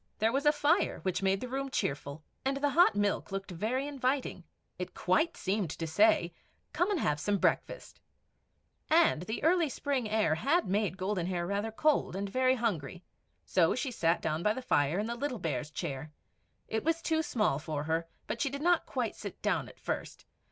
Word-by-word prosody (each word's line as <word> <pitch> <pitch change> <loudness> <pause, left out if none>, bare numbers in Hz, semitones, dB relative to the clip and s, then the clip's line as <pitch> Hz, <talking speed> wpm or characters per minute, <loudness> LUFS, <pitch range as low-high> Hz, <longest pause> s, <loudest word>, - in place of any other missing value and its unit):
There 220 +1 +2
was 275 +4 0
a - - +8
fire, 295 +4 +2
which 185 -1 -1
made 195 0 +1
the 255 - -4
room 270 +2 -3
cheerful, 140 - -3 0.2
and 270 +1 0
the 285 0 +1
hot 335 - +5
milk 205 0 0
looked 195 0 -4
very 225 +10 -1
inviting; 265 -8 -1 0.4
it 180 0 -5
quite 185 - +1
seemed 195 -2 -1
to 165 - -4
say, 320 - +3 0.4
"Come 355 +3 +1
and 400 -5 +1
have 150 - +1
some 205 +5 +1
breakfast;" - - -1 0.9
and 320 - +4
the 220 +6 -4
early 335 -1 +3
spring 265 -4 -2
air 215 -7 +2
had 280 - +2
made 200 -1 0
Golden 185 -2 -1
Hair 175 -2 -1
rather 200 +4 -2
cold, 295 -4 +1
and 200 +1 -2
very 255 +5 +2
hungry; 180 - -2 0.4
so 170 -3 +3
she 260 0 -2
sat 170 -7 +1
down 155 0 -1
by 210 +4 +2
the 260 - -5
fire 145 - +2
in 210 - 0
the 235 - -2
little 255 +1 -3
Bear's 150 - -3
chair. 150 -2 -5 0.6
It 220 - -2
was 330 +1 0
too 320 -1 +1
small 215 - 0
for 155 -2 -3
her, 165 +2 -1 0.2
but 230 - -4
she 280 - +1
did 280 +2 -5
not 350 0 +3
quite - - -2
sit - - -8
down - - 0
at - - -16
first. - - -5
215 Hz, 195 wpm, -31 LUFS, 175-275 Hz, 0.9 s, a